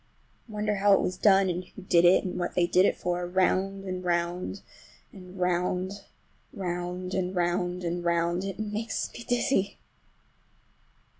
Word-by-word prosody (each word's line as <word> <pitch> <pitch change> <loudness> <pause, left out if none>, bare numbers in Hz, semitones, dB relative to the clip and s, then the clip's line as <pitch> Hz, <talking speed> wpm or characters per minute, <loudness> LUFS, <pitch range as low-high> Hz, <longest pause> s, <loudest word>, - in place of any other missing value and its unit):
I - - -11
wonder 210 0 -1
how 200 +1 +5
it - - +5
was 185 - -1
done 195 0 +4
and 180 0 -2
who 190 +1 -13
did 175 -2 +4
it, 175 +2 +6
and 180 -1 -4
what 175 - -3
they 175 - +3
did 180 +2 +4
it - - 0
for. 175 0 -2
Round 190 +2 +1
and 185 -1 -4
round 175 +2 -2 0.5
and 185 -1 -12
round—round 180 0 -3
and 185 0 -1
round 180 +1 0
and 175 0 -2
round—it 170 +3 0
makes 215 +1 -3
me 235 - -8
dizzy! 240 -4 +1
180 Hz, 150 wpm, -28 LUFS, 175-195 Hz, 0.5 s, it